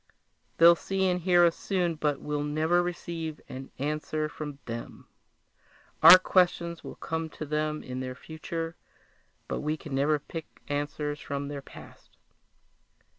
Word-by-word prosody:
They'll 170 +1 +8
see 190 +2 -1
and 180 -1 +1
hear 175 0 +5
us 170 - +2
soon, 180 -4 0
but 150 -2 -1
we'll 150 -1 -2
never 155 +4 +2
receive 170 -3 -4
an 130 +1 -8
answer 150 +2 -2
from 150 -2 -7
them! 115 0 -7 1.0
Our 165 +4 +12
questions 175 -2 +1
will - - -8
come 160 0 -3
to 155 - -7
them 150 +1 -1
in 125 0 -5
their 130 0 -4
future 165 +3 -5 0.7
but - - -2
we 155 +1 -1
can 150 -2 -9
never 145 +3 +2
pick 160 +2 -9
answers 145 0 -2
from 140 0 -4
their 145 -1 -5
past!" - - -15
155 Hz, 145 wpm, -28 LUFS, 145-170 Hz, 1.0 s, Our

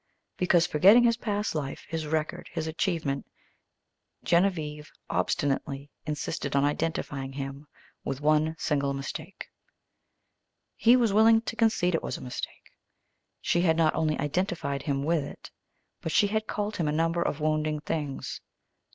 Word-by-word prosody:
Because, 175 -2 +3
forgetting 195 +9 +6
his 235 -1 +3
past 210 -3 -2
life, 145 -3 -4
his 160 -2 -3
record, 155 0 -2
his 165 -2 -3
achievement, 160 -4 -1 1.0
Genevieve 160 -4 +1 0.2
obstinately 140 -2 -1 0.2
insisted 150 -1 -3
on 140 - +4
identifying 145 -3 -2
him 135 +1 -6 0.4
with 135 -1 -3
one 155 +2 +2
single 140 -3 0
mistake. 135 0 -6 1.3
He 235 +2 +5
was 235 -5 +3
willing 225 +1 +6
to 230 - -5
concede 220 -6 +2
it 165 - +1
was - - -4
a - - -11
mistake. 125 -1 -7 0.7
She 175 - +2
had 165 -2 +3
not 160 -2 +3
only 155 -1 0
identified 150 -3 -1
him 140 -2 -1
with 160 0 +1
it, 140 - -10 0.5
but 160 - -3
she 205 - +4
had 215 +1 -1
called 210 0 -2
him 165 - 0
a - - +1
number 165 +2 +1
of 150 - -1
wounding 155 0 0
things. 150 -2 -4
155 Hz, 145 wpm, -28 LUFS, 145-180 Hz, 1.3 s, forgetting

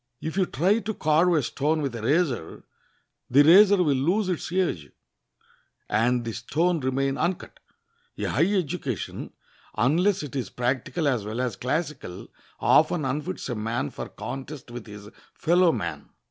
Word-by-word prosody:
If 160 0 -5
you 190 -2 +2
try 190 - +2
to 220 -1 -4
carve 160 +3 +3
a 150 - +2
stone 150 +5 0
with 135 -3 -2
a 115 - -5
razor, 135 - 0 0.7
the 140 +3 +6
razor 190 +4 +7
will 145 -4 +2
lose 185 +9 +1
its 175 -2 -3
edge, 170 - -1 1.0
and 120 +3 +1
the 115 - -3
stone 160 +10 0
remain 135 0 -1
uncut. 175 +1 -2 0.6
A - - -4
high 185 - +1
education, 175 - -3 0.5
unless 170 - +2
it 145 -1 -8
is 130 - -3
practical 130 +6 -1
as 125 -6 +1
well 110 +3 -5
as 125 -5 -1
classical, 140 - -4 0.3
often 155 -1 +3
unfits 140 +3 -3
a - - -1
man 110 -6 -2
for - - -7
contest 135 0 -7
with 120 -1 -8
his 105 -1 -10 0.3
fellow 175 +1 +3
man. 105 - -5
145 Hz, 155 wpm, -25 LUFS, 120-175 Hz, 1.0 s, razor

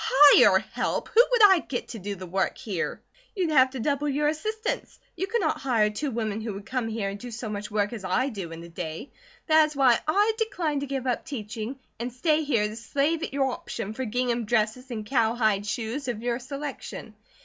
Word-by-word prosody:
"Hire 290 +1 +7
help! - - -2
Who 460 - +7
would 485 -3 +4
I 380 -3 +6
get 260 -5 -5
to 230 - -6
do 200 +1 -4
the 185 0 -8
work 190 +2 -1
here?" 195 -7 -4 0.3
"You'd 360 -5 0
have 260 -3 +6
to 260 0 -7
double 285 +4 0
your 295 +2 +1
assistants. 435 +9 -3 0.2
You 380 +2 -2
could 465 +2 0
not - - 0
hire 225 -5 +2
two 285 +8 -3
women 220 -3 -2
who 220 -3 -4
would 200 0 -8
come 250 +1 -2
here 220 -3 -2
and 200 +1 -6
do 245 - -7
so 230 -1 -6
much 210 0 -5
work 210 +1 0
as 220 -4 -6
I 250 +9 +1
do 195 -8 -6
in 165 0 -8
a - - -9
day. 165 - -6 0.3
That 315 -1 +6
is 305 - -10
why 260 -4 +5
I 410 +7 +3
decline 345 -10 -1
to 280 - -4
give 265 -1 -3
up 250 -2 0
teaching, 225 -1 -5 0.2
and 240 +2 -3
stay 305 +5 +1
here 235 -8 +1
to 215 - -7
slave 280 +8 0
at - - -3
your 270 -1 +1
option, 210 -3 -5
for 260 +3 -3
gingham 240 0 -1
dresses 230 +3 0
and 220 -3 -5
cowhide 220 -4 +1
shoes, 235 +6 -3
of 235 -2 -3
your 240 0 -1
selection. 275 -4 -7
245 Hz, 220 wpm, -26 LUFS, 215-285 Hz, 0.3 s, Hire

